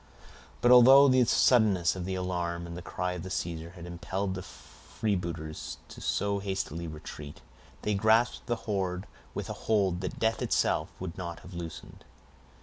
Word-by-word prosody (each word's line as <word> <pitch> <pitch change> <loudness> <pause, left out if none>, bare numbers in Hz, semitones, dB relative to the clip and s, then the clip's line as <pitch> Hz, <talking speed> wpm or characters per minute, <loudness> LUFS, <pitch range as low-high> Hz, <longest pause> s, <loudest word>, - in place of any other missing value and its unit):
But 120 - +5
although 130 +3 +9
the 130 -1 +5
suddenness 105 -9 +4
of 90 -2 -4
the 95 0 -2
alarm 90 -2 -2
and 85 0 -7
the 90 - -6
cry 90 0 -3
of 90 +1 -6
Caesar 85 -2 -3
had 85 -2 -9
impelled 95 +3 -3
the 95 - -5
freebooters 85 - -5
to - - -11
so 100 0 0
hasty 95 -4 -3
a - - -5
retreat, 75 -1 -9 0.4
they 105 - +1
grasped 110 +4 +2
the 120 - +1
hoard 95 -3 -1 0.3
with - - -3
a - - -4 0.2
hold 95 -5 +2
that 90 - -4
death 110 0 +1
itself - - +1
would 90 -2 -5
not 85 -2 -5
have 90 - -12
loosened. 85 -2 -8
90 Hz, 165 wpm, -29 LUFS, 85-105 Hz, 0.4 s, although